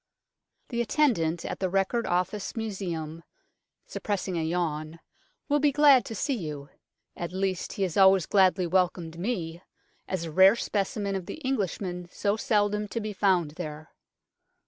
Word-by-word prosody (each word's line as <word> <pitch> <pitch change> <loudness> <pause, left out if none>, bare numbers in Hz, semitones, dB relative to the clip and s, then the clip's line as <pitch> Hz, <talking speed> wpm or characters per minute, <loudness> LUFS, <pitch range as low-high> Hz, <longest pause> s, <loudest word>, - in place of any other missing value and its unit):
The 235 -2 -1
attendant 210 - +1
at - - -4
the 185 - 0
Record 195 +5 0
Office 185 +3 -1
Museum 175 -7 -4 0.6
(suppressing 195 -3 -3
a 165 - 0
yawn) 160 -1 -2 0.5
will 290 0 +2
be 290 0 +3
glad 285 -3 +6
to 225 - -6
see 280 +7 -1
you. 150 - -5 0.5
At 170 0 -5
least, 190 -1 -2
he 200 - -2
has 180 -2 -2
always 190 -3 +6
gladly 190 -1 +3
welcomed 175 -2 0
me, 175 -5 -3 0.5
as 185 -3 -2
a 165 - -5
rare 190 +6 +7
specimen 200 -2 -2
of 185 -2 -4
the - - -6
Englishman 190 -7 -2
so 200 0 0
seldom 210 -1 +1
to 230 - -3
be 215 -1 -4
found 185 -6 +2
there. 155 -1 -7
190 Hz, 150 wpm, -27 LUFS, 170-210 Hz, 0.6 s, rare